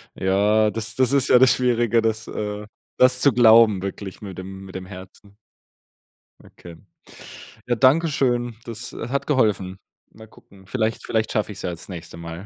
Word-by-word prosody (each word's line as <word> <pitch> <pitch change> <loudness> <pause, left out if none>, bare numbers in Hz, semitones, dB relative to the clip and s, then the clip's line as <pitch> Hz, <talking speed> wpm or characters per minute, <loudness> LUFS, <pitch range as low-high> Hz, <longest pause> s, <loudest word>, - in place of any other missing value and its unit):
Ja, 105 +3 +2
das 115 0 -6
das 130 0 +2
ist 140 -2 +2
ja 125 +1 +7
Schwierige, 120 -2 +2
das 110 0 -2
äh, 105 0 -5 0.3
das 125 0 +3
zu 140 - +5
glauben, 110 -4 +5
wirklich 100 0 -7
mit 95 -3 -9
dem 95 +1 -9
mit 95 - -13
dem 95 0 -6
Herzen. 100 +2 -13 1.1
Okay, 85 -2 -14 0.9
ja, 120 - +1
danke 140 +7 +4
schön, 120 -4 -1
das, 115 0 -7
äh, 115 - -6
hat 140 +1 -2
geholfen. 100 -9 0 0.3
Mal 110 0 -15
gucken, 95 -3 -20
vielleicht 110 -1 -2
vielleicht 110 -1 -1
schaffe 110 -1 -1
ich - - -10
es - - -8
ja 90 - -2
das 85 +3 -10
nächste 85 -2 -9
Mal. 85 +3 -8
110 Hz, 175 wpm, -22 LUFS, 95-120 Hz, 1.1 s, ja